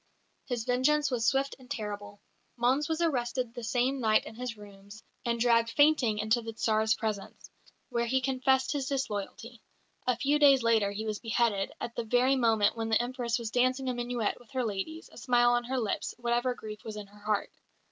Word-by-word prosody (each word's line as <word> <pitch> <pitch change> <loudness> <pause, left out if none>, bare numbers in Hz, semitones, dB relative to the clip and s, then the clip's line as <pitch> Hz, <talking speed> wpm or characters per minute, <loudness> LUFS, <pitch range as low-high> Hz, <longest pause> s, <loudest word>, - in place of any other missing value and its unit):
His 245 -3 -2
vengeance 265 +4 +2
was 235 -2 0
swift 275 +1 +1
and 255 -1 -16
terrible. 205 -2 -5 0.4
Mons 260 +6 +2
was 320 +1 -1
arrested 250 -5 -1
the 240 - -7
same 250 +4 0
night 215 -3 +3
in - - -8
his 240 -1 -5
rooms, 205 +1 -13 0.2
and 235 0 0
dragged 230 -1 +3
fainting 285 -5 +3
into 220 +3 +1
the 225 0 -6
Tsar's 220 0 +2
presence, 215 -3 -5 0.4
where 235 0 -1
he 265 +3 +2
confessed 260 0 +1
his 280 -3 -2
disloyalty. 235 -3 -4 0.5
A 250 -2 +2
few 285 +4 +1
days 275 -4 +6
later 225 -3 +3
he 205 +2 -5
was 215 -1 -3
beheaded, 225 -3 0
at 235 - -5
the 235 - -2
very 245 +4 +3
moment 225 -5 +3
when 225 -1 -3
the 220 - +3
Empress 240 -1 -1
was 230 -2 -5
dancing 255 +2 +1
a - - 0
minuet 240 -2 -2
with 240 - -19
her 260 -1 0
ladies, 225 +11 -4
a - - -14
smile 240 -1 +3
on 240 0 +1
her 260 +2 -2
lips, 220 -5 -2
whatever 240 +1 0
grief 215 -2 -9
was 220 - -6
in 210 -1 -6
her 205 +1 -18
heart. 210 0 -1
240 Hz, 200 wpm, -29 LUFS, 220-255 Hz, 0.5 s, days